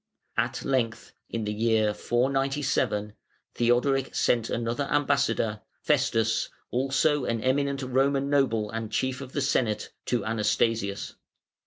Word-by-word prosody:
At -, -, -1 dB
length, 120 Hz, -4 st, -1 dB, 0.2 s
in 115 Hz, -1 st, -3 dB
the 105 Hz, -, -2 dB
year 110 Hz, -1 st, +2 dB
497, 130 Hz, -4 st, 0 dB, 0.4 s
Theodoric 125 Hz, +3 st, +1 dB
sent 115 Hz, -2 st, +2 dB
another 120 Hz, +4 st, -1 dB
ambassador, 140 Hz, -7 st, +1 dB, 0.2 s
Festus, 120 Hz, -6 st, +1 dB, 0.2 s
(also 135 Hz, +2 st, +1 dB
an 115 Hz, -1 st, -1 dB
eminent 140 Hz, +1 st, +1 dB
Roman 135 Hz, +2 st, +1 dB
noble 125 Hz, -7 st, +1 dB
and 115 Hz, -1 st, -4 dB
Chief 130 Hz, +2 st, -1 dB
of 130 Hz, -1 st, -9 dB
the 145 Hz, -, -1 dB
Senate,) 130 Hz, -6 st, 0 dB, 0.2 s
to 120 Hz, -, 0 dB
Anastasius. 110 Hz, -1 st, 0 dB
125 Hz, 120 wpm, -27 LUFS, 115-135 Hz, 0.4 s, year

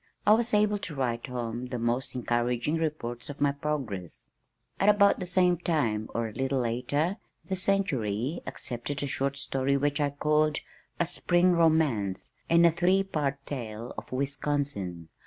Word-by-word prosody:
I 210 Hz, -, +7 dB
was 230 Hz, +1 st, +2 dB
able 210 Hz, 0 st, +3 dB
to 175 Hz, -5 st, -5 dB
write 120 Hz, -2 st, -1 dB
home 120 Hz, -1 st, -4 dB
the 125 Hz, -1 st, -4 dB
most 120 Hz, +3 st, -1 dB
encouraging 120 Hz, +4 st, 0 dB
reports 150 Hz, -7 st, -3 dB
of 145 Hz, -, -7 dB
my 145 Hz, -1 st, +3 dB
progress. 135 Hz, -, -4 dB, 0.5 s
At 200 Hz, -, +4 dB
about 200 Hz, -1 st, +5 dB
the 180 Hz, -, -3 dB
same 180 Hz, -1 st, +3 dB
time 115 Hz, -12 st, 0 dB
(or 115 Hz, -1 st, 0 dB
a 110 Hz, -, -9 dB
little 135 Hz, +1 st, 0 dB
later) 135 Hz, -, 0 dB, 0.3 s
the 190 Hz, -, -1 dB
Century 150 Hz, -, 0 dB
accepted 135 Hz, +3 st, -4 dB
a -, -, 0 dB
short 140 Hz, 0 st, -1 dB
story 135 Hz, 0 st, 0 dB
which 145 Hz, +2 st, 0 dB
I 145 Hz, -, +2 dB
called 150 Hz, +1 st, +1 dB, 0.4 s
A 175 Hz, -, +3 dB
Spring 175 Hz, +1 st, +2 dB
Romance, 155 Hz, -, +2 dB, 0.2 s
and 170 Hz, 0 st, +6 dB
a 170 Hz, -, +7 dB
three 185 Hz, +4 st, +3 dB
part 140 Hz, -7 st, -2 dB
tale 115 Hz, -4 st, -5 dB
of -, -, -8 dB
Wisconsin. 135 Hz, -, -2 dB
140 Hz, 160 wpm, -28 LUFS, 120-165 Hz, 0.5 s, I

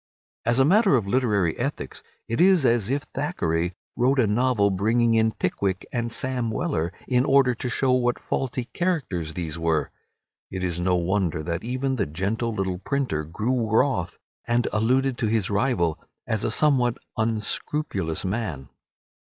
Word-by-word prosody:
As 120 Hz, +1 st, +3 dB
a 135 Hz, -, +5 dB
matter 200 Hz, +1 st, +5 dB
of 115 Hz, -6 st, +1 dB
literary 100 Hz, -7 st, +1 dB
ethics, -, -, -4 dB, 0.3 s
it 115 Hz, +8 st, 0 dB
is 185 Hz, -5 st, +5 dB
as 115 Hz, -4 st, +2 dB
if 140 Hz, +2 st, 0 dB
Thackeray 85 Hz, -, -1 dB, 0.2 s
wrote 130 Hz, +3 st, +2 dB
a 125 Hz, -, +4 dB
novel 105 Hz, -1 st, +2 dB
bringing 115 Hz, +5 st, +2 dB
in 110 Hz, 0 st, +3 dB
Pickwick 95 Hz, -1 st, -2 dB
and 120 Hz, -1 st, -1 dB
Sam 125 Hz, -1 st, -1 dB
Weller 110 Hz, -, -1 dB, 0.2 s
in 125 Hz, -1 st, +3 dB
order 135 Hz, -2 st, +4 dB
to 125 Hz, +1 st, -4 dB
show 130 Hz, +2 st, +1 dB
what 125 Hz, -1 st, +2 dB
faulty 130 Hz, -1 st, -2 dB
characters 115 Hz, -, -2 dB
these 85 Hz, -2 st, -4 dB
were. 80 Hz, -3 st, 0 dB, 0.6 s
It 95 Hz, -1 st, -5 dB
is 85 Hz, -2 st, -1 dB
no 90 Hz, +1 st, +2 dB
wonder 90 Hz, -3 st, 0 dB
that 85 Hz, +1 st, -3 dB
even 130 Hz, +3 st, -2 dB
the 100 Hz, -, 0 dB
gentle 100 Hz, +9 st, -2 dB
little 95 Hz, -4 st, -2 dB
printer 130 Hz, -, -1 dB
grew 110 Hz, +8 st, -1 dB
wroth, 110 Hz, -6 st, +1 dB, 0.3 s
and 120 Hz, 0 st, +1 dB
alluded 125 Hz, +4 st, +1 dB
to 115 Hz, -, +1 dB
his 105 Hz, -3 st, 0 dB
rival 100 Hz, -7 st, +1 dB, 0.3 s
as 110 Hz, -2 st, -1 dB
a -, -, +1 dB
somewhat 130 Hz, -6 st, +3 dB, 0.2 s
unscrupulous 110 Hz, -, -2 dB
man. 95 Hz, -, -3 dB
115 Hz, 160 wpm, -24 LUFS, 90-130 Hz, 0.6 s, a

